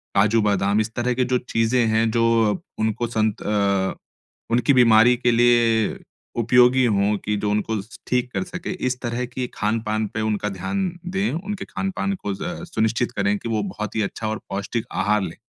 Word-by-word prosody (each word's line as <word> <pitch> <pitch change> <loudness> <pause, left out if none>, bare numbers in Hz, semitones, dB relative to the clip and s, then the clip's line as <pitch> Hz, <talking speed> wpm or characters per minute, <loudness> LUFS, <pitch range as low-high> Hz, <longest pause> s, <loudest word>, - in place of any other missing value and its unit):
काजू-बादाम, 105 -1 +3
इस 110 +1 -4
तरह 125 +1 0
की 125 +1 +1
जो 125 0 +1
चीज़ें 115 0 +1
हैं, 110 +1 +2
जो 115 -1 +3 0.3
उनको 110 +2 0
संत 110 -2 -1
अ, 100 -2 +1 0.6
उनकी 125 +4 +3
बीमारी 120 -1 +6
के 125 0 +2
लिए 115 -2 +3 0.4
उपयोगी 125 +2 +5
हों 105 -2 +2
कि 105 - 0
जो 105 0 -1
उनको 105 0 -1
स 110 +3 -14
ठीक 125 0 0
कर - - -1
सकें, 180 -1 -6
इस 130 -9 -2
तरह 120 0 -2
की 125 +1 -4
खान-पान 110 0 -1
पे 110 - -2
उनका 105 -1 -1
ध्यान 185 - -2 0.2
दें। 195 +3 -1
उनके 195 +4 -4
खान-पान 195 +1 -2
को 100 - -2
ज़ 95 - -6 0.3
सुनिश्चित 115 +2 0
करें 100 +1 +1
कि 115 - -6
वो 110 -2 0
बहुत 105 +2 -5
ही 110 - +1
अच्छा 110 +2 -3
और 110 - -3
पौष्टिक 100 +4 -3
आहार 105 0 +1
लें। - - -5
115 Hz, 180 wpm, -22 LUFS, 105-125 Hz, 0.6 s, बीमारी